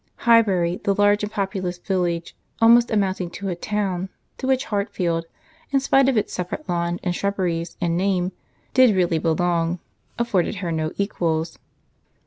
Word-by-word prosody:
Highbury, 195 -7 +4
the 200 - +1
large 205 +1 +3
and 210 0 -3
populous 190 -3 -2
village, 175 -2 -2 0.2
almost 235 +1 +6
amounting 190 -4 0
to 200 -1 -4
a 180 - -2
town, 190 -1 -2 0.3
to 260 - -3
which 265 0 +2
Hartfield, 180 -5 -1 0.4
in 275 - +2
spite 270 0 +3
of 260 - +1
its 210 - -1
separate 180 - -4
lawn, 175 0 -1
and 180 - 0
shrubberies, 180 -4 -2
and 170 -1 0
name, 185 -1 +1 0.4
did 255 -5 +5
really 175 -3 +2
belong, 170 +1 +1 0.4
afforded 210 -5 0
her 180 -3 -3
no 155 -1 -1
equals. 165 -5 -1
185 Hz, 150 wpm, -23 LUFS, 175-210 Hz, 0.4 s, almost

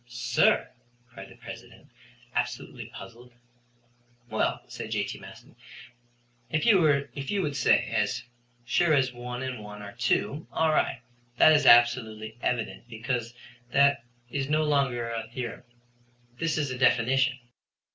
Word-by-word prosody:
"Sir!" 120 -1 +2 0.4
cried 95 -2 -10
the - - -15
President, - - -12 0.4
absolutely - - -3
puzzled. 120 +1 -12 1.0
"Well," - - 0
said - - -7
J.T. - - -2
Maston, - - -14 0.9
"if 155 - 0
you 145 - +2
would 145 -3 -2
say, 140 - +3
as 115 +2 -1 0.4
sure 160 +6 +3
as 130 -2 +1
one 125 +1 -6
and 125 -4 -5
one 105 0 -9
are 100 - -8
two, 125 +6 -1
all 160 -1 +2
right. - - 0 0.4
That 155 - +7
is 145 -3 +3
absolutely 115 -2 +4
evident, 120 -1 -2
because 120 +1 -3 0.4
that 140 -2 +4 0.3
is 140 0 -2
no 155 +1 +2
longer 135 -5 +1
a 115 -1 -4
theorem; 120 -1 -6 0.7
this 165 -1 0
is 145 -4 -1
a 125 - -5
definition." 130 +1 +3
125 Hz, 130 wpm, -27 LUFS, 115-140 Hz, 1.0 s, That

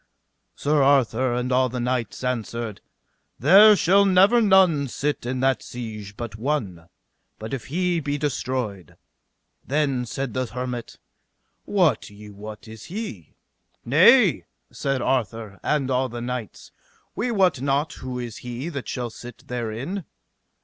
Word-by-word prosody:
Sir 150 0 +1
Arthur 130 -3 +3
and 125 +1 -2
all 130 0 +3
the 125 +1 -4
knights 125 0 -2
answered: 115 -3 -3 0.6
There 200 - +8
shall 195 +2 +4
never 195 +5 +5
none 185 -9 +4
sit 140 0 -3
in 130 0 -2
that 135 -1 +2
siege 105 -4 -8
but 115 -3 -6
one, 105 - -3 0.5
but 110 +3 -7
if 135 - -4
he 175 +3 0
be 145 -1 -2
destroyed. 125 - -3 0.7
Then 135 -3 0
said 135 +1 -4
the 130 -1 -1
hermit: 125 -1 -5 0.7
Wot 175 - +2
ye 105 0 -12
what 105 +2 -10
is 110 0 -11
he? 180 - -7 0.5
Nay, 170 - +5 0.3
said 135 -3 -2
Arthur 115 -5 -2
and 140 -3 0
all 130 0 +1
the 120 0 -6
knights, 120 -4 -6 0.4
we 245 +4 -1
wot 190 - +2
not 140 +3 0
who 130 -1 -6
is 120 -3 -6
he 125 +6 -6
that 140 -6 -6
shall 120 -3 -4
sit 120 +2 -12
therein. 125 - -4
130 Hz, 140 wpm, -24 LUFS, 115-150 Hz, 0.7 s, There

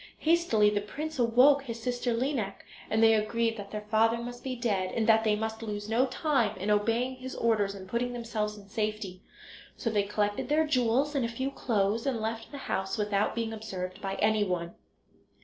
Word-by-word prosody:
Hastily 310 -11 +3
the 205 0 0
prince 300 +8 -6
awoke 250 +4 +5
his 235 -4 -6
sister 245 +1 -1
Lineik, 235 -4 -2 0.2
and 220 +1 +2
they 225 0 +7
agreed 225 +1 +1
that 200 -1 -7
their 210 0 -6
father 225 +1 +4
must 245 +1 -7
be 260 -1 -3
dead, 205 -6 -1
and 225 - +1
that 220 0 +5
they 215 -1 +3
must 220 +1 -3
lose 210 -2 -4
no 235 +4 +2
time 255 - 0
in 195 +3 -1
obeying 230 +5 +1
his 260 0 -7
orders 210 -4 +1
and 190 -1 -9
putting 240 +4 -1
themselves 220 -3 -3
in 200 -1 -13
safety. 210 -3 -3 0.6
So 230 - -1
they 210 -1 +2
collected 205 +2 -1
their 310 +2 +3
jewels 265 0 +2
and 275 -3 +1
a - - +1
few 260 +4 -3
clothes 220 -1 0
and 255 -4 0
left 225 +1 -4
the 285 - -7
house 190 0 -2
without 205 -1 0
being 230 -1 -2
observed 190 -3 -6
by 195 -1 -3
anyone. 190 -5 +1
225 Hz, 195 wpm, -29 LUFS, 210-245 Hz, 0.6 s, they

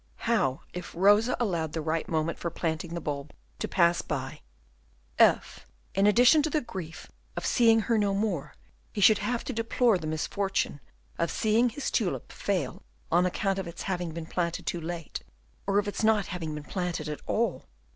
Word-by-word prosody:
How 215 - +1
if 180 -1 -7
Rosa 205 +7 +4
allowed 170 -9 -1
the 165 - -2
right 160 +1 -1
moment 160 0 -1
for 170 - -2
planting 165 0 -3
the - - -2
bulb 145 -2 -4 0.3
to - - -2
pass 170 -2 +3
by, 135 0 -4 0.8
if, - - +3 0.3
in 195 +1 +3
addition 245 +8 +6
to 310 - 0
the 310 - +1
grief 185 - -8 0.3
of - - -3
seeing 225 -2 +5
her 225 +1 +1
no 200 -1 +1
more, 200 -8 -2 0.4
he - - -4
should 205 +1 +6
have 245 -1 -1
to 260 - -4
deplore 230 -2 +2
the 155 - -5
misfortune 190 +1 -1 0.4
of 170 - +1
seeing 225 +3 +2
his 270 +5 -4
tulip 205 -7 -1
fail 180 -10 -2 0.3
on 175 +2 +4
account 195 +1 -1
of 190 - -4
its 170 - -7
having 180 -3 -2
been 165 0 -6
planted 170 0 -2
too 170 - -2
late, 165 -1 -5 0.5
or 200 0 +2
of 205 0 +2
its 205 - -3
not 215 -2 +4
having 165 -4 -4
been 150 - -6
planted 175 -1 -3
at 150 -1 -5
all! 230 +2 0
180 Hz, 185 wpm, -28 LUFS, 165-215 Hz, 0.8 s, addition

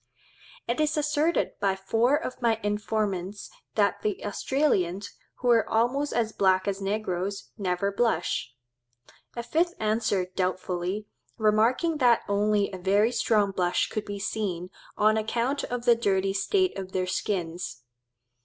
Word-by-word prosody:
It 235 +4 -1
is 305 0 +1
asserted 300 +2 +1
by 195 -1 +1
four 225 +7 +2
of 295 -5 -4
my 230 -2 +2
informants 205 -2 -2 0.2
that 205 -2 +2
the 210 -1 -2
Australians, 200 - 0 0.2
who 245 -1 +1
are 230 -2 +3
almost 250 +6 +1
as 225 -1 0
black 190 -2 +2
as 200 0 -1
negroes, 195 -1 -2
never 195 -1 -1
blush. 200 - 0 0.8
A 235 - -3
fifth 335 +8 0
answers 215 -4 0
doubtfully, 185 +2 -2 0.3
remarking 225 +10 +2
that 245 -4 +4
only 205 0 +1
a 190 - -7
very 200 +5 +3
strong 210 -4 +2
blush 180 -2 0
could 215 - -3
be 205 0 -5
seen, 190 -3 -3 0.3
on 215 +1 +4
account 235 +5 -1
of 245 -1 -4
the 240 - +7
dirty 195 -4 +1
state 370 - +1
of 190 -1 -7
their 185 -1 0
skins. 175 - -3
210 Hz, 140 wpm, -27 LUFS, 190-235 Hz, 0.8 s, the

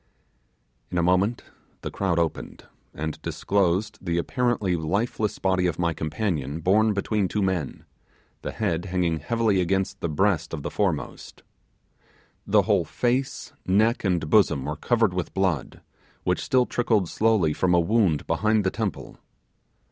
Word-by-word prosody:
In 90 - -3
a 85 - +2
moment 95 +6 +2 0.4
the - - -5
crowd 95 -4 -1
opened, 85 -2 -2 0.3
and 80 0 -5
disclosed 100 +2 0
the 85 0 -1
apparently 110 -1 0
lifeless 100 +6 -1
body 95 -1 +1
of 85 - -2
my 85 -1 0
companion 80 - -2
home 105 +3 +3
between 100 0 0
two 105 +2 -1
men, 90 -7 -2 0.6
the - - -4
head 90 -5 -2
hanging 90 -3 0
heavily 110 +3 +1
against 95 +2 -1
the 85 - -2
breast 90 +1 +1
of 75 - -8
the - - -4
foremost. - - -3 1.0
The - - +4
whole - - +2
face, 125 +2 -2
neck, 110 +5 +3
back, - - -14
and 90 -5 0
bosom 75 -7 +3
were 75 +1 -3
covered 115 +3 +1
with 90 -1 -4
blood, 90 -8 -1 0.4
which - - 0
still 125 -1 +2
trickled 110 -7 +1
slowly 105 -6 +2
from 90 +1 +2
a - - +5
wound 90 -4 +2
behind 110 0 +1
the 95 - +1
temple. - - -4
95 Hz, 150 wpm, -25 LUFS, 85-110 Hz, 1.0 s, a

